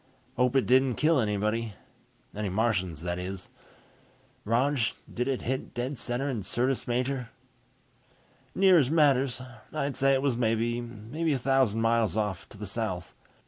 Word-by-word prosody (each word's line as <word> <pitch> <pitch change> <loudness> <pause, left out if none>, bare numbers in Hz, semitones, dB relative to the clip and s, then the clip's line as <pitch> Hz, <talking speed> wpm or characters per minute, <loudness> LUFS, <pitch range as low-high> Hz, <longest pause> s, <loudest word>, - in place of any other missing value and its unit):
"Hope 125 +1 +2
it 135 - +4
didn't 130 -1 +4
kill 155 -1 +3
anybody. 110 0 -1 0.6
Any 105 -1 -2
Martians, 95 -6 0
that 90 0 -2
is. 95 +1 -6 1.0
Rog, 130 +6 +2 0.3
did 125 +1 -1
it 135 -2 -1
hit 130 +2 -3
dead 125 +4 -2
center 125 +2 -2
in 125 -6 -2
Syrtis 125 +7 -1
Major?" 125 0 -1 1.3
"Near 190 -2 +6
as 135 -4 +2
matters. 140 -5 +3 0.3
I'd 140 -1 -2
say 135 0 +3
it 135 0 +1
was 140 -4 +2
maybe 120 +5 -1
a - - +1
thousand 130 -4 +2
miles 115 -3 +2
off, 95 -7 -2
to - - -14
the 105 - -6
south. 95 -3 -4
120 Hz, 145 wpm, -28 LUFS, 105-135 Hz, 1.3 s, Near